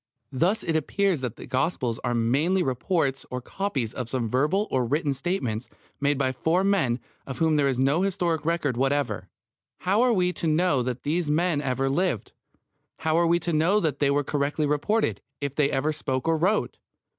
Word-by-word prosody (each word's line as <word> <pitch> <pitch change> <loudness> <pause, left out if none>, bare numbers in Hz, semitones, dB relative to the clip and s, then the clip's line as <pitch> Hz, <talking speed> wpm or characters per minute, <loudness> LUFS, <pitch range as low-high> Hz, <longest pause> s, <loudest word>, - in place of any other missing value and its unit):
Thus 175 - +1
it 165 - -1
appears 180 +1 +1
that 125 -4 -3
the - - -10
Gospels 130 -4 -1
are 120 -1 0
merely 145 +11 +2
reports 135 0 0
or 125 - -3
copies 135 - -3
of 125 -3 -4
some 125 -3 -1
verbal 150 - +1
or 130 -1 +2
written 145 +4 0
statements 130 - -3 0.3
made 145 0 +1
by 130 -1 +1
four 165 +8 +1
men 165 -12 +2 0.3
of 135 -2 -5
whom 160 0 +2
there 145 -2 +3
is 130 -2 0
no 140 +6 +2
historic 175 -4 0
record 155 -6 0
whatever. 140 +2 0 0.5
How 195 +5 +2
are 250 0 +4
we 180 -4 +2
to 170 - -3
know 155 -3 +2
that 125 0 -3
these 160 +1 0
men 160 0 +1
ever 135 -1 0
lived? 140 - 0 0.7
How 160 -1 0
are 170 0 +3
we 170 +1 +4
to 170 +1 -2
know 170 +7 +3
that 155 -7 -1
they 145 - +3
were 145 +1 +2
correctly 145 +2 -1
reported, 150 +10 0 0.2
if 140 -2 -3
they 145 -1 +2
ever 150 +4 0
spoke 130 -2 -3
or 165 - +3
wrote? 190 +7 0
150 Hz, 190 wpm, -26 LUFS, 130-175 Hz, 0.7 s, are